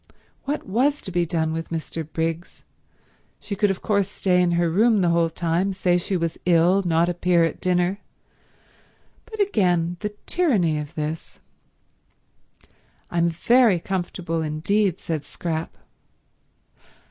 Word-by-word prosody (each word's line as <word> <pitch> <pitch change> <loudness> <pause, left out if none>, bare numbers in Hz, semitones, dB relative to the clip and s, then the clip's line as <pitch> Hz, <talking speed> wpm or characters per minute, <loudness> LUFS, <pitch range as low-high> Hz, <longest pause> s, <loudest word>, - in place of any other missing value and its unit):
What 290 +2 -3
was 265 +9 +1
to 190 - -5
be 175 -1 0
done 160 -2 -1
with 165 0 -4
Mr. 165 0 -4
Briggs? 165 +1 -3 0.8
She 200 - -5
could 205 +1 +2
of 195 - -3
course 200 -3 +1
stay 185 -3 +1
in 175 -1 +2
her 170 0 +2
room 210 +5 +3
the 175 - +2
whole 170 -1 +2
time, 170 +3 -1
say 180 -2 +1
she 185 +2 -2
was 165 -1 -3
ill, 175 +2 +4
not 170 -1 +2
appear 175 -1 +2
at 165 - -2
dinner; 180 +2 +1 1.3
but 440 -2 -10
again, 180 - +1
the 210 0 -5
tyranny 205 - +1
of 150 0 -7
this... 155 +1 -5 1.7
"I'm 170 0 +2
very 220 +3 +3
comfortable 175 -2 -3
indeed," 165 +5 0
said 155 -3 -3
Scrap. 160 +1 -5
175 Hz, 135 wpm, -23 LUFS, 165-200 Hz, 1.7 s, ill